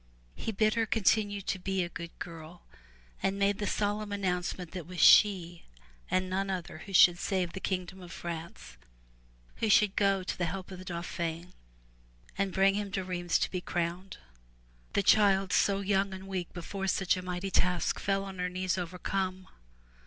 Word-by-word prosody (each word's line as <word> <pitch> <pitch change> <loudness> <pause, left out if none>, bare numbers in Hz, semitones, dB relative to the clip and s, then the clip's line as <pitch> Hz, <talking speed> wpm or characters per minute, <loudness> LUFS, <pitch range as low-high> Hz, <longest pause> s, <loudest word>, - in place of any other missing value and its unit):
He 225 - -4
bade 215 +1 +2
her 225 -1 0
continue 205 -1 +2
to 190 0 -3
be 190 0 -1
a - - -3
good 170 0 -7
girl 165 0 -9 0.6
and 195 +1 0
made 200 +1 +1
the 205 - -1
solemn 205 +1 -1
announcement 180 -3 -2
that 185 - -5
it 165 - -10
was 180 -1 -7
she 175 -5 +5 0.4
and 185 0 +1
none 195 +1 -1
other 175 -4 -4
who 195 - -10
should 175 -1 +7
save 185 -4 -1
the 190 - -5
kingdom 185 0 -3
of 175 -1 -10
France, 170 - -7 0.8
who 220 - 0
should 210 -1 +5
go 195 -2 +2
to - - -3
the 180 - -1
help 185 +2 -5
of 185 - -8
the 185 - -10
Dauphin 170 0 -4 0.8
and 195 0 0
bring 195 +1 +4
him 205 0 -2
to 190 - -1
Rheims 175 -1 0
to - - -1
be 180 - -3
crowned. 175 +2 -3 0.8
The 200 - +2
child, 195 -2 +4
so 200 0 +3
young 195 -1 +1
and 190 +1 -10
weak 185 -3 -4
before 195 +3 -5
such 190 -1 +2
a 185 - -4
mighty 180 +1 -4
task, 180 0 +1
fell 195 0 0
on 190 -1 -8
her 180 0 0
knees 185 +1 -1
overcome. 185 +1 -3
185 Hz, 180 wpm, -30 LUFS, 180-195 Hz, 0.8 s, should